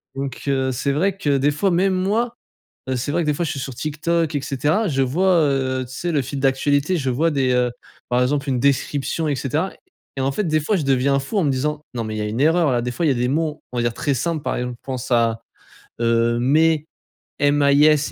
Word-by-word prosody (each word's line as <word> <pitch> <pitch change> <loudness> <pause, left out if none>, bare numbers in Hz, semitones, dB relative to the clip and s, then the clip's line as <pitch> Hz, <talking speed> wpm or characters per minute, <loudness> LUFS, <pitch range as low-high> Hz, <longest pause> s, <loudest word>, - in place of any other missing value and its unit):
donc, 135 -2 -5
heu. 130 -1 +1
C'est 130 +3 -1
vrai 185 +7 0
que 145 -7 +1
des 140 +2 +2
fois 150 +7 0
même 185 +2 +2
moi, 210 +6 0 0.6
heu, 130 - 0
c'est 125 +4 -3
vrai 170 - +1
que - - -3
des 150 - +2
fois 170 - -1
je - - -2
suis 140 - -5
sur 130 0 -5
TikTok 155 +3 -1
et 145 - 0
cetera, 150 - 0
je 135 -4 0
vois, 175 +9 +2
heu, 130 -2 0
tu 130 - -10
sais 175 +4 -2
le 150 - +2
fil 135 +1 -4
d'actualité 140 +5 +1
je 135 -3 -2
vois 155 +7 +1
des, 135 -4 +1
heu, 125 0 +2 0.4
par 125 0 +2
exemple 140 +2 0
une 125 -2 0
description 140 +3 0
et 145 - 0
cetera 150 +8 -1 0.4
et - - -3
en 135 +1 0
fait, 210 - -1
des 155 -2 +1
fois 200 +8 0
je 170 - -1
deviens 135 0 +2
fou 140 +10 -3
en 190 - +2
me 145 - +2
disant: 150 +3 -1
«Non, 120 - -2
mais 110 -1 -4
il - - -4
y - - -1
a - - -2
une 105 +4 -3
erreur 160 0 +3
là». 120 -1 +1
Des 125 - -2
fois 145 +8 -1
il - - +4
y - - +4
a - - -1
des 125 0 0
mots, 150 +2 -1
on 125 - -3
va - - +1
dire 120 -1 0
très 140 - -1
simples 155 +4 -2
par - - -2
exemple 125 0 -3
je - - -44
pense 130 -1 -5
à, 115 -2 +2 0.6
heu, 115 0 +2
mais 155 +4 +3 0.6
M 145 0 +3
A 140 0 +4
I 145 +2 +6
S, 155 -1 +3
140 Hz, 270 wpm, -21 LUFS, 130-155 Hz, 0.6 s, I